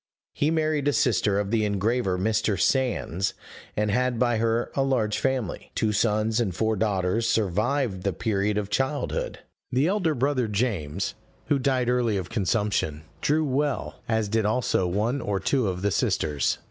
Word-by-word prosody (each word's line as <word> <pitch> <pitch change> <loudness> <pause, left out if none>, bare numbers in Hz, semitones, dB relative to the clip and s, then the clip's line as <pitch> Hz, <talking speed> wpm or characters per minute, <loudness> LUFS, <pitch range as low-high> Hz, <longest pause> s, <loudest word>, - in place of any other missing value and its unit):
He 145 - +1
married 155 -3 +1
a 145 - +3
sister 105 -5 +2
of 100 0 -2
the 115 -2 +2
engraver 105 0 0
Mr. 110 0 0
Sands, 110 -9 0 0.4
and 105 0 +1
had 125 +2 +1
by 120 -1 +2
her 115 +1 0
a 135 - 0
large 125 -6 +1
family; 130 -9 -2
two 110 - +1
sons 110 +1 +1
and 100 -7 -1
four 110 +2 +1
daughters 105 +1 0
survived 110 +1 0
the 100 - 0
period 100 +2 0
of 105 -1 -3
childhood. 150 - -1 0.3
The 130 +3 +2
elder 180 -4 +1
brother, 130 -2 +1
James, 100 - -1 0.4
who 140 - +3
died 130 -2 +1
early 120 -4 +2
of 90 -2 -5
consumption, 100 -7 0 0.2
drew 155 +2 +2
well, 140 +1 -1
as 110 -2 +1
did 110 +2 +1
also 105 -4 +1
one 110 +9 0
or 100 -3 -1
two 130 -1 +1
of 90 0 -3
the 100 - +2
sisters. 75 -5 0
110 Hz, 165 wpm, -26 LUFS, 100-130 Hz, 0.4 s, a